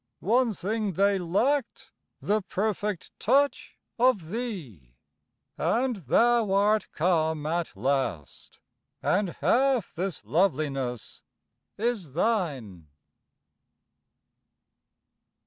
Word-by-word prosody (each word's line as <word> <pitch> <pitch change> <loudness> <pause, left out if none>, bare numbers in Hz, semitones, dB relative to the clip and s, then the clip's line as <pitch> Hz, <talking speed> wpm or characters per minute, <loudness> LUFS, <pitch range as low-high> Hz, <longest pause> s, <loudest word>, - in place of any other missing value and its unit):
One 235 +4 +2
thing 210 +1 -2
they 200 +2 +2
lacked: 230 +10 -1 0.3
the 210 +1 0
perfect 205 0 -3
touch 280 -1 +1 0.2
Of 215 -10 +2
thee 150 - -6 0.6
and 235 +9 +1
thou 225 - +2
art 205 +2 +2
come 160 -2 0
at 165 -8 -2
last, 125 - -3 0.5
And 200 0 +1
half 260 -4 +2
this 180 - -4
loveliness 135 - -1 0.6
is 210 - -2
thine. 140 - -1
190 Hz, 80 wpm, -27 LUFS, 150-225 Hz, 0.6 s, One